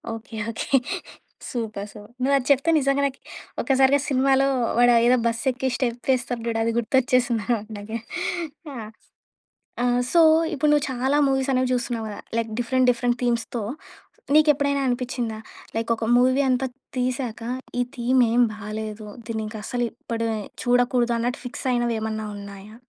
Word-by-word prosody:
Okay. 225 0 -10 0.2
Okay. 270 +4 +1 0.7
Super. 215 -5 -4
Super. 210 +1 -13
నువు 275 +2 +2
అది 260 - -3
చెప్తే 280 +4 +3
నిజంగా 275 0 +2
నాకీ 275 -1 -3 0.4
ఒక్కసారిగా 270 +1 +4
సినిమాలో 270 0 +3 0.3
వాడా 245 0 +6
ఏదో 250 +1 +5
బస్ 230 0 -2
ఎక్కి 260 +1 -3
స్టెప్ 245 0 -2
ఏస్తాడు 245 -1 -2
జూడు 230 -1 -1
అది 230 - +1
గుర్తొచ్చేసింది 245 -1 +2
నాకు 220 -1 -4
నాకే. 220 +3 -5 0.7
యాహ్! 225 -5 -7 0.9
ఆ! - - +2 0.3
సో 340 - +5 0.3
ఇప్పుడు 300 +1 +1
నువ్వు 295 -1 +3
చాలా 265 +3 +1
మూవీస్ 270 0 +1
అనేవి 255 -1 +1
జూస్తున్నావు 240 -2 -1
గదా! 205 - -7 0.2
లైక్ 230 -1 -1
డిఫరెంట్ 255 +2 +2
డిఫరెంట్ 240 0 0
థీమ్స్‌తో 235 -1 -1 0.7
నీకెప్పుడైనా 285 -2 +4
అనిపిచ్చిందా 245 -3 -2 0.4
లైక్, 225 +1 -2
ఒక 225 - -4
మూవీ 255 +3 +4
అంతా 255 +1 +2 0.3
తీశాక 250 -2 -2 0.4
ఈ - - +4
థీమ్ 250 +2 +2
ఏం 245 +1 +4
బాలేదు. 215 0 -6 0.2
దీన్నింకా 220 -1 -4
అసలే 245 -1 -1
ఎప్పుడే 230 -1 -3 0.3
చూడకూడదు 245 -1 +2
అన్నట్టు 245 +3 -2
ఫిక్స్ 265 +2 -6
అయినవి 240 -1 +1
ఏమన్నా 220 0 -3
ఉన్నాయా? 200 +1 -10
245 Hz, 145 wpm, -24 LUFS, 225-260 Hz, 0.9 s, వాడా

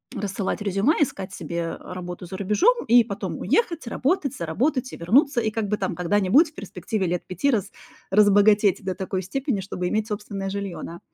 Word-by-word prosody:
рассылать 200 +1 -3
резюме, 200 - +2
искать 195 -9 -1
себе 170 -2 -4
работу 180 0 -7
за 190 - -7
рубежом, 350 - +2
и 240 +1 +7
потом 200 -3 -5
уехать, 335 - 0
работать, 280 +2 0
заработать 250 - -1
и - - -7
вернуться. 255 - +3
И 220 - 0
как 215 -1 -2
бы 210 - 0
там 190 - -2
когда-нибудь, 205 - +3
в - - -35
перспективе 190 +1 -3
лет 175 0 -2
5 185 +9 -1
раз 220 -8 0 0.4
разбогатеть 205 0 +4
до 185 -1 -2
такой 190 0 -3
степени, 255 - -2
чтобы 180 -1 -4
иметь 215 +3 -1
собственное 205 -2 -4
жилье, 200 -2 -4
да. 170 +1 -8
205 Hz, 180 wpm, -24 LUFS, 185-240 Hz, 0.4 s, и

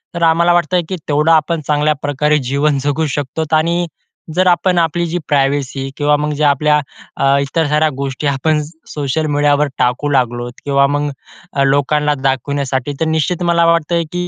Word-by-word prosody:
तर 170 - -2
आम्हाला 170 +1 +4
वाटतं 175 +1 +2
की 190 - -2
तेवढं 150 +3 +2
आपण 165 0 +2
चांगल्या 150 0 +2
प्रकारे 150 +1 +1
जीवन 140 +1 +1
जगू 145 +2 0
शकतो, 145 +3 -3
आणि 170 +2 +1 0.5
जर 185 0 +3
आपण 180 +1 +2
आपली 170 +1 0
जी 170 - -2
प्रायव्हेसी, 135 -1 0
किंवा 150 0 +2
मग 150 +1 -2
जे 150 - -2
आपल्या 150 +1 +3 0.4
अ, 135 0 +3
इतर 145 +3 -1
साऱ्या 150 +1 +2
गोष्टी 140 +1 -3
आपण 150 +3 +1 0.3
सोशल 150 +1 -1
मीडियावर 145 0 +2
टाकू 125 +4 0
लागलोत, 120 -2 -1
किंवा 140 -1 +3
मग 145 +1 -1 0.6
लोकांना 145 +2 +1
दाखवण्यासाठी, 135 0 -1
तर - - +2
निश्चित 160 +3 -1
मला 170 -1 +3
वाटतं 170 0 +2
की 180 0 -3
150 Hz, 165 wpm, -16 LUFS, 140-160 Hz, 0.6 s, आम्हाला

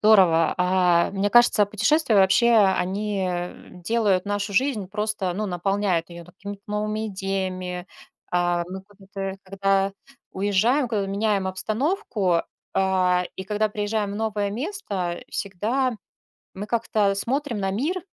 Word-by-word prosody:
здорово. 185 -7 +5
А 180 -1 +3
мне 200 +1 -1
кажется, 240 -3 +5
путешествия 245 +6 +2
вообще, 195 +4 +5
они 195 0 +1 0.6
делают 210 -5 +2
нашу 205 0 -2
жизнь, 230 -2 +1
просто, 210 -2 -1
ну, 210 +4 -2
наполняют 190 -1 0
её 170 0 -9
какими-то 200 +3 -9
новыми 215 +1 -2
идеями. 185 -2 -3 0.4
А, 175 -1 +1
мы 190 +1 -7
куда-то 195 -1 -7
когда 195 0 0 0.4
уезжаем, 205 +8 +2
когда 210 -4 -1
меняем 200 0 0
обстановку, 215 - 0 0.3
а, 185 -2 +2
и - - -5
когда 210 +2 0
приезжаем 210 0 -2
в - - -5
новое 210 -2 -1
место, 205 - -3
всегда 230 +7 -1 0.6
мы 200 +2 -6
как-то 215 -3 +1
смотрим 250 +3 -2
на 195 -1 -1
мир 310 - -1
200 Hz, 125 wpm, -24 LUFS, 190-215 Hz, 0.6 s, здорово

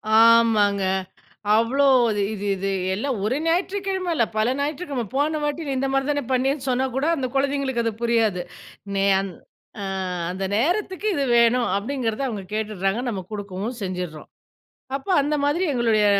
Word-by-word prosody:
ஆமாங்க. 225 -3 +5 0.7
அவ்ளோ 240 +5 +2 0.3
இது 205 -1 0
இது 205 0 -5
இது 195 +1 -2 0.3
எல்லாம் 245 0 -2
ஒரு 245 +5 +1
ஞாயிற்றுக்கிழம 380 +1 0
இல்ல. 230 - +3
பல 230 +4 +2
ஞாயிற்றுக்கிழம. 285 -4 -2
போன 300 +2 +1
வாட்டி 295 +1 -2
நீ - - -1
இந்த 270 +1 0
மாதிரி 270 +1 +1
தானே 285 -2 -1
பண்ணியேன்னு 270 +2 0
சொன்னா 255 +1 +1
கூட, 270 +3 0
அந்த 260 -2 -1
கொழந்தைங்களுக்கு 270 -3 0
அது 225 - 0
புரியாது. 225 -6 +2 0.6
நே 195 - +2
அந் 195 -1 -3 0.5
ஆ - - -4 0.5
அந்த 190 +1 -3
நேரத்துக்கு 375 - 0
இது 280 -1 0
வேணும். 235 +1 +4
அப்டிங்கிறத 235 +2 -2
அவங்க 210 -5 -4
கேட்டுர்றாங்க 215 0 -1
நம்ம 195 -4 -3
குடுக்கவும் 205 +3 -5
செஞ்சுர்றோம். 180 -4 -5 0.7
அப்ப 280 +8 -6
அந்த 295 +2 0
மாதிரி 320 +6 +1
எங்களுடைய 225 -4 +2
240 Hz, 150 wpm, -23 LUFS, 210-280 Hz, 0.7 s, ஆமாங்க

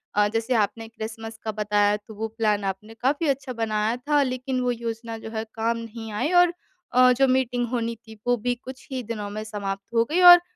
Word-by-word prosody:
अ, 205 0 +4
जैसे 225 +3 0
आपने 225 +1 0
क्रिसमस 225 0 -7
का 220 - -2
बताया 210 -1 +2
तो 215 +1 -13
वो 220 +2 -2
प्लान 215 -2 0
आपने 195 +3 -4
काफ़ी 285 +5 +1
अच्छा 265 -1 -1
बनाया 220 0 0
था 290 +3 +2
लेकिन 255 0 -2
वो 250 0 +1
योज़ना 230 -1 -4
जो 220 - -8
है 220 -1 -2
काम 230 +1 0
नहीं 230 -1 -7
आई 215 +11 -1
और 350 -1 +3 0.4
अ, 250 0 +7
जो 270 +2 +3
मीटिंग 245 -2 +1
होनी 235 -2 -1
थी 220 -1 -12
वो 245 0 +4
भी 245 +3 -1
कुछ 260 0 -10
ही 255 -2 -3
दिनों 210 -2 -4
में 215 +1 -5
समाप्त 200 0 -5
हो 230 0 +4
गई 360 +2 +3
और 350 0 +9
225 Hz, 215 wpm, -25 LUFS, 215-250 Hz, 0.4 s, और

